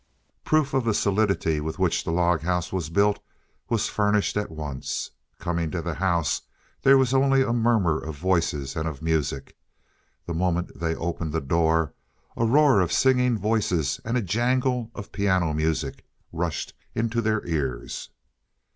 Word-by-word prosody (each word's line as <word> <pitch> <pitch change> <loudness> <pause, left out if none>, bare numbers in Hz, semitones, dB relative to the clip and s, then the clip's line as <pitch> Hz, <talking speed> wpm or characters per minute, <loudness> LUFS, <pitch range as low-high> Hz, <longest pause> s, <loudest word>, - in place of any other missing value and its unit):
Proof 155 -3 +2
of 135 -1 +2
the 115 -3 +1
solidity 100 -6 +1
with 80 +1 -4
which 95 -3 +1
the - - -2
log 85 -1 +2
house 90 +1 -1
was 85 -5 -2
built 100 +4 +2 0.5
was 115 -3 +1
furnished 105 -1 +1
at 105 0 -1
once. 75 -4 -5 0.3
Coming 85 -2 -2
to 90 - -3
the 85 0 -3
house, 85 -3 0 0.4
there 135 0 +6
was 130 -1 +2
only 135 0 +4
a 115 - 0
murmur 110 -9 +2
of 80 -2 -7
voices 80 -5 0
and 80 0 -2
of 75 -2 -6
music. 75 -4 -1 0.7
The 85 - -4
moment 90 +1 -1
they 80 -1 -1
opened 85 -2 -3
the 80 - +1
door, 80 +1 +1 0.4
a 115 - +1
roar 140 -1 +5
of 90 -2 0
singing 125 -1 +3
voices 100 -8 0
and 115 +3 -1
a 120 - 0
jangle 125 +4 0
of 100 - -8
piano 95 -5 +1
music 75 -2 -1 0.3
rushed 80 -3 -3 0.2
into 115 +1 0
their 110 -1 0
ears. 75 -7 -3
90 Hz, 160 wpm, -25 LUFS, 80-115 Hz, 0.7 s, there